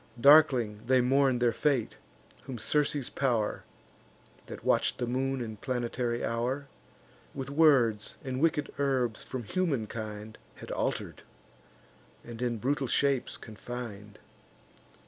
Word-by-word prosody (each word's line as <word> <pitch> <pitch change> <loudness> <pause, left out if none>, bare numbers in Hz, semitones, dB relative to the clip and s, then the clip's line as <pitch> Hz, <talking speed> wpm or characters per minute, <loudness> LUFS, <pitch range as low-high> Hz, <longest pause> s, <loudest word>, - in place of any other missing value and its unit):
Darkling 125 -7 +6
they 130 0 +5
mourn 130 +1 +3
their 120 -1 +2
fate, 130 -2 0 0.5
whom 130 - -6
Circe's 145 +2 0
pow'r, 120 -6 0 0.9
(That - - -9
watch'd - - +2
the 120 - -1
moon 130 +2 -1
and 110 -3 -6
planetary 120 -1 -2
hour,) 125 +5 -2 0.7
With 135 0 -5
words 130 -9 +3
and 130 -1 -3
wicked 160 -2 +1
herbs 130 -5 0
from 130 -2 -6
humankind 110 - -3 0.2
Had - - -9
alter'd, - - -3 1.0
and 120 0 -9
in 120 -2 0
brutal 135 +4 -1
shapes 135 0 +1
confin'd. 110 -2 -8
125 Hz, 115 wpm, -29 LUFS, 115-140 Hz, 1.0 s, Darkling